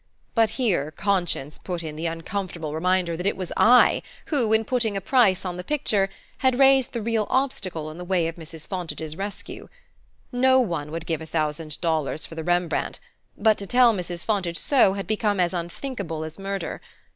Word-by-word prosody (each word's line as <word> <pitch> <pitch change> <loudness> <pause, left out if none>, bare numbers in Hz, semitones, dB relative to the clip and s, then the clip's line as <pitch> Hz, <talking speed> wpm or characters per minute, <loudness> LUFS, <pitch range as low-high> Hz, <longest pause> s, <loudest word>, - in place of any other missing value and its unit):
But 225 -2 +4
here 190 - +1
conscience 175 -5 -1
put 175 -2 -4
in 155 -1 -6
the 160 +2 -2
uncomfortable 165 -1 -4
reminder 180 +1 +1
that 180 +4 -2
it - - 0
was 185 -2 -5
I 245 +2 +6 0.3
who, 250 -8 +1
in 220 0 +3
putting 225 -4 0
a - - 0
price 195 -3 +3
on 180 -1 -3
the 180 - -5
picture, 210 -9 +1 0.3
had 260 -2 +2
raised 270 -1 +5
the 235 - -3
real 225 -2 0
obstacle 185 - -1
in 160 - -10
the - - -5
way 175 -2 +1
of 165 - -5
Mrs. 160 -1 -8
Fontage's 165 -4 -5
rescue. 200 +3 -6 0.6
No 260 +1 +4
one 170 - -1
would 165 0 -5
give 160 -2 -2
a 160 - -7
thousand 155 -1 -2
dollars 160 -3 0
for - - -10
the 160 0 -5
Rembrandt; 175 0 0 0.4
but 215 0 +3
to 200 - -6
tell 245 0 +5
Mrs. 175 -3 -4
Fontage 185 -6 0
so 250 -9 +4
had 195 0 -4
become 210 -2 0
as 180 0 +2
unthinkable 175 - -4
as 160 +3 -8
murder. 195 -2 -4
185 Hz, 190 wpm, -24 LUFS, 165-220 Hz, 0.6 s, I